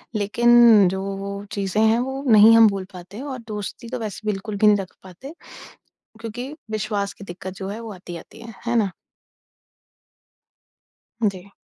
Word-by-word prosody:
लेकिन 230 0 +5
जो 190 0 -3 0.2
वो 200 0 -5 0.2
चीज़ें 200 +1 -1
हैं, 220 +1 +4
वो 265 +2 -3
नहीं 220 +1 +8
हम 225 -1 +8
भूल 195 -2 -4
पाते 185 +5 -10
और 275 -2 -5
दोस्ती 210 +2 -6
तो 255 - -4
वैसे 215 -1 -6
बिल्कुल 205 +1 -5
भी 215 - +4
नहीं 210 -1 +6
रख 195 -2 -7
पाते 190 - -11 0.9
क्योंकि 245 +5 -6 0.2
विश्वास 210 -2 -2
की 200 - -12
दिक्कत 185 0 -8
जो 190 - -4
है 210 +3 -6
वो 225 -2 -7
आती-आती 180 +4 -11
है। 230 -1 -10
है 240 0 +1
ना? 205 -5 +1 2.4
जी। 195 -1 -5
210 Hz, 160 wpm, -22 LUFS, 195-230 Hz, 2.4 s, नहीं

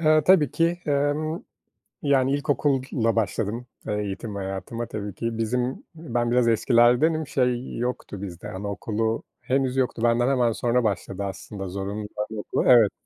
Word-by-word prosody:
Eee, 155 -1 +5
tabii 165 -8 +6
ki. 170 +1 +1
Emm, 145 +3 0 0.6
yani 135 -2 +3
ilkokulla 135 -5 +1
başladım, 115 +2 -1 0.2
eee, 105 - -1
eğitim 100 +2 -5
hayatıma 95 +4 -4
tabii 105 -3 -5
ki. 115 -1 -3
Bizim, 125 +3 -1
ben 120 -7 -1
biraz 125 -1 +3
eskilerdenim. 125 +7 +4
Şey 125 -2 0
yoktu 120 -5 -3
bizde 95 0 -7
anaokulu 105 +3 -2 0.2
henüz 130 0 0
yoktu. 125 -3 0
Benden 120 +1 +3
hemen 125 -4 +3
sonra 120 +2 +1
başladı 100 -2 -2
aslında 95 0 -6
zorunlu 100 +2 -4 0.2
anaokulu. 105 -1 -2
Evet. 115 -5 +7
120 Hz, 140 wpm, -25 LUFS, 105-135 Hz, 0.6 s, Evet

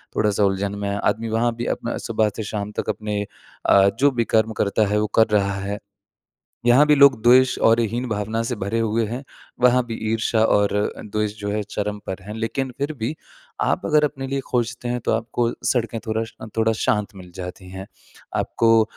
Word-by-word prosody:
थोड़ा-सा 105 -1 +2
उलझन 100 +1 -1
में 100 0 -2
है। 100 - -2
आदमी 115 +1 0
वहाँ 115 +2 +1
भी 120 +1 -4
अपना 120 - -4
सुबह 110 -2 +2
से 110 - -3
शाम 105 0 -4
तक - - -3
अपने 105 -1 -2 0.4
अ, 100 0 +6
जो 140 +1 +5
भी 120 -3 0
कर्म 110 0 +3
करता 105 +1 +1
है, 105 +1 +1
वो 105 - 0
कर 110 - +5
रहा 100 -2 +2
है। 100 +1 -4 0.9
यहाँ 125 +5 +6
भी 150 - +5
लोग 140 -5 +6
द्वेष 125 +2 +5
और 115 +1 +4
हीन 120 +3 -1
भावना 110 +1 -2
से 125 - -1
भरे 100 +3 -2
हुए 115 0 +1
हैं, 120 +6 -5 0.4
वहाँ 125 0 +4
भी 115 - -4 0.2
ईर्ष्या 110 0 +1
और 105 -2 +2
अ, 105 - -1
द्वेष 105 0 -3
जो 105 0 -3
है 105 0 -1
चरम 105 0 -3
पर 95 0 -5
हैं। 105 +3 -8
लेकिन 115 +4 -2
फिर 145 +2 -1
भी, 125 +4 -3 0.4
आप - - +1
अगर 150 -1 +4
अपने 135 -2 -3
लिए 135 +1 -2
खोजते 120 0 -2
हैं 120 0 -1
तो - - +1
आपको 115 +1 0
सड़कें 115 -2 0
थोड़ा 110 0 0
श 115 - -13
अ, - - -6
थोड़ा 110 0 +3
शांत 105 -2 -1
मिल 90 -2 -11
जाती 90 0 -7
हैं। 95 +1 -7 0.5
आपको 115 -1 +3
110 Hz, 210 wpm, -22 LUFS, 105-120 Hz, 0.9 s, अ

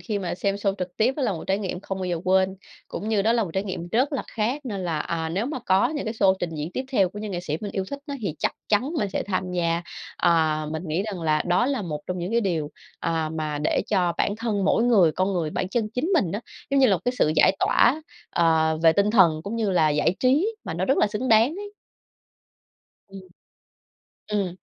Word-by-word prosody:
khi 215 -4 -3
mà 185 -3 -3
xem 195 +2 -1
show 200 -1 -1
trực 180 -1 -5
tiếp 245 +5 +2
đó 290 - -2
là 230 - +1
một 165 - -6
trải 195 +1 +1
nghiệm 185 -3 -4
không 195 -1 -5
bao 185 - -3
giờ 175 -2 -2
quên, 190 +1 +2 0.3
cũng 215 - -5
như 210 -3 +2
đó 225 - +3
là 235 -2 +2
một 180 - -7
trải 190 +2 0
nghiệm 180 -3 -5
rất 255 - +1
là 275 - -1
khác 240 +6 -2
nên 205 -6 -4
là, 165 -3 -1
à, 160 +1 -2
nếu 195 +9 -1
mà 285 -2 -3
có 190 +5 +4
những 295 0 -4
cái 220 - -3
show 195 -3 +4
trình 175 -2 -3
diễn 155 +2 -4
tiếp 260 - -2
theo 195 -7 +3
của 205 - -9
những 210 0 -5
nghệ 175 -2 -3
sĩ 155 -4 -3
mình 205 -2 -4
yêu 190 -1 -2
thích 280 - -4
á 285 - -4
thì 185 -8 -3
chắc - - 0 0.2
chắn 245 +8 +1
mình 200 - 0
sẽ - - -2
tham 185 -2 -2
gia. 170 -1 0 0.3
Ờ, 155 -2 +2
mình 160 - -4
nghĩ 160 +5 0
rằng 200 -4 -5
là 155 -1 +2
đó 180 +7 +3
là 270 -5 -1
một 155 -5 -4
trong 180 0 -3
những 175 +2 -3
cái 235 - +3
điều, 165 -8 -1 0.3
ờ, 165 -2 -1
mà 155 -2 -3
để 150 - +1
cho 180 -4 +2
bản 205 - 0
thân 220 -4 -1
mỗi 230 - +3
người, 195 -10 +5
con 185 +4 0
người, 170 -4 -1
bản 180 - -2
chân 215 +2 -1
chính 250 +6 0
mình 195 - +2
á, 205 - -2 0.3
giống 275 - +3
như 265 - +7
là, 195 -4 +4
một - - -10
cái 245 - +1
sự 155 - +3
giải 190 - +5
tỏa, 280 +7 +3 0.3
ờ, 160 -1 +2
về 165 -1 +7
tinh 200 +4 +2
thần, 170 -8 +5
cũng 200 +6 -4
như 220 -4 0
là 160 -4 +3
giải 150 +4 +2
trí 310 - +2
mà - - -4
nó - - -1
rất 270 - +2
là - - +4
xứng 210 +5 -3
đáng 225 +2 +6
ấy. 410 +1 -7 1.4
Ừm. 195 0 -10 1.1
Ừm. 190 -4 -1
195 Hz, 255 wpm, -24 LUFS, 170-225 Hz, 1.4 s, như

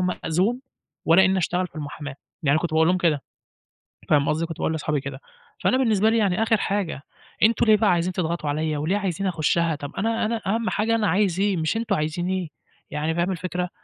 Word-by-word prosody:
مأذون 185 +5 0 0.4
ولا 175 +4 +6
إنّي 190 0 +2
أشتغل 180 +1 0
في - - -23
المُحاماة." 145 -1 -6 0.3
يعني 145 - +2
أنا - - +3
كنت 175 - -1
باقول 160 0 +4
لهم 185 - +3
كده 155 -6 +1 0.9
فاهم 145 -2 +3
قصدي، 160 +2 0
كنت 165 -1 -7
باقول - - -1
لاصحابي 150 -2 -1
كده. 135 -1 -7 0.4
فأنا 255 - +3
بالنسبة 220 -4 +3
لي 230 - +2
يعني 205 -1 +2
آخِر 225 0 +3
حاجة، 195 -8 -2 0.4
أنتم 230 +1 +4
ليه 215 - +6
بقى 210 -2 +3
عايزين 175 +1 0
تضغطوا 170 -4 -2
عليّا 155 0 -1
وليه 160 +7 0
عايزين 195 -1 -2
أخُشّها؟ 165 -1 +1
طَب 145 0 -8
أنا 225 +2 0
أنا 225 +1 -2
أهَم 225 +3 0
حاجة 220 +2 +1
أنا 220 -2 +1
عايز 190 -3 +1
إيه 200 -1 +1
مش 160 +7 0
أنتم 230 - 0
عايزين 155 +4 -2
إيه. 185 -4 -2 0.4
يعني 155 +2 -2
فاهم 175 +2 0
الفكرة، 180 0 -3
180 Hz, 210 wpm, -24 LUFS, 160-205 Hz, 0.9 s, ولا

